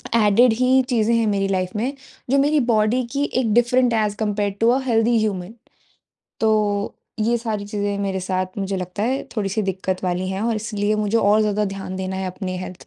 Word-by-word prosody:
Added 225 +2 +5
ही 255 +3 +3
चीज़ें 230 -2 +2
हैं 230 -1 +2
मेरी 200 -1 +1
लाइफ 185 -1 -2
में 245 +6 -1 0.4
जो 275 - +3
मेरी 295 +2 +3
बॉडी 215 +4 +2
की 280 +1 0 0.2
एक 225 -3 0
different 240 +1 +3
as 210 -2 +1
compared 205 -2 -1
to 230 - +4
a, 255 +3 +3
healthy 230 -1 +2
human. 200 -2 -2 0.9
तो 210 -2 +1 0.3
ये 235 +2 +2
सारी 220 -3 -3
चीज़ें 205 -1 -2
मेरे 195 -1 -2
साथ 185 +1 -3
मुझे 195 0 -2
लगता 185 +2 -4
है 260 +4 0
थोड़ी-सी 205 +1 -1
दिक्कत 190 -1 -3
वाली 180 +1 -1
हैं 190 +1 -3
और 230 -1 0
इसलिए 210 -1 -1
मुझे 215 +2 +1
और 210 +1 +4
ज़्यादा 210 0 +1
ध्यान 195 -1 -5
देना 190 0 -3
है 190 - -3
अपनी 185 0 -4
हेल्थ 185 0 -8
210 Hz, 195 wpm, -21 LUFS, 195-230 Hz, 0.9 s, Added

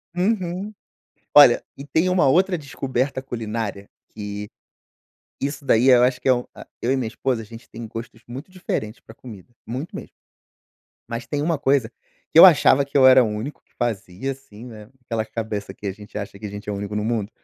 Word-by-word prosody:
Uhum. 190 +1 -1 0.6
Olha, 145 -5 +8
e 140 - -9
tem 160 +6 +1
uma 180 -6 +3
outra 180 +4 +3
descoberta 130 -1 -3
culinária, 110 -5 -5 0.2
que, 105 -1 -6 0.9
isso 140 0 -3
daí 125 +1 +4
eu 125 -1 +7
acho 125 0 +2
que - - -3
é 130 - +7
um 125 0 -3
a - - -11 0.2
eu 120 - 0
e 135 - +3
minha 125 -4 -2
esposa, 125 +1 -2
a 110 - -10
gente 115 +3 -13
tem 115 0 -8
gostos 115 +1 -8
muito 135 +9 -8
diferentes 125 - -4
pra 110 - -14
comida, 115 -1 -13
muito 130 +8 -6
mesmo, - - -9 0.9
mas 115 0 -5
tem 145 +3 -2
uma 160 -1 0
coisa 135 -4 +1 0.4
que - - +4
eu 170 - +12
achava 140 -4 +5
que 140 - -5
eu 130 -1 +7
era 130 0 +8
o - - +1
único 110 +7 -5
que - - -39
fazia, 115 +2 -3
assim, 120 -4 -13
né, 110 -4 -11 0.2
aquela 115 -2 -2
cabeça 110 -3 -5
que 105 - -9
a 95 - -1
gente 105 +2 -13
acha 100 -1 -6
que 105 - -7
a - - -6
gente 105 +1 -9
é 105 - -1
o - - -3
único 100 +1 -4
no 105 - -1
mundo. 110 -2 -1
120 Hz, 210 wpm, -22 LUFS, 105-140 Hz, 0.9 s, eu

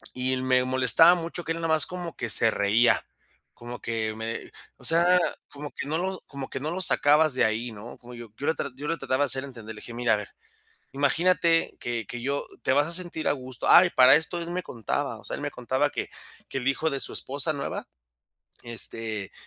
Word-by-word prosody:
y 130 +1 -1
l 130 0 -1
me 130 -1 +3
molestaba 130 +6 +6
mucho 170 0 -5
que 165 - -1
él - - -6
nada 165 0 -2
más 160 -1 +3
como 180 -2 -7
que 120 - -3
se 115 - +5
reía. 110 +4 +3 0.5
Como 120 +1 -9
que 110 -2 -2
me 110 +1 -4 0.3
o - - -14
sea, 175 +2 +5 0.3
como 145 0 -8
que - - -7
no 155 +3 -1
lo 185 +1 -3
como 140 -2 -7
que - - -6
no 150 +3 -3
lo 180 +3 -4
sacabas 150 -2 +4
de 130 - +3
ahí, 115 +2 -1
¿no? 110 +3 -10
Como 125 0 -9
yo 120 -1 -9
yo 145 - -4
lo 160 - +2 0.2
yo 145 +2 -6
lo 165 - 0
trataba 130 +2 0
de - - +1
hacer 130 0 +1
entender. 115 -5 -9
Le 105 - -11
dije: - - -8
"Mira, 120 -1 +2
a - - +1
ver, 105 -1 -7 0.6
imagínate 165 +4 +2
que 120 -2 -3
que 120 - -6
yo 140 +3 -2 0.2
te 130 - +1
vas 145 +3 +3
a - - -3
sentir 170 -3 -2
a - - +3
gusto". 130 -3 -5
Ah, 180 - +8
y - - -3
para 130 -1 +7
esto, 160 +3 -1
él 170 0 -5
me 180 +1 -2
contaba, 115 -4 -3
o - - -17
sea, - - -4
él - - -7
me - - -3
contaba - - 0
que - - -4 0.4
que - - -3
el 130 - -6
hijo 160 +4 0
de 140 - -2
su - - +1
esposa 140 +3 0
nueva, 140 -2 -5 0.8
este: 110 -3 -4
135 Hz, 235 wpm, -26 LUFS, 120-160 Hz, 0.8 s, Ah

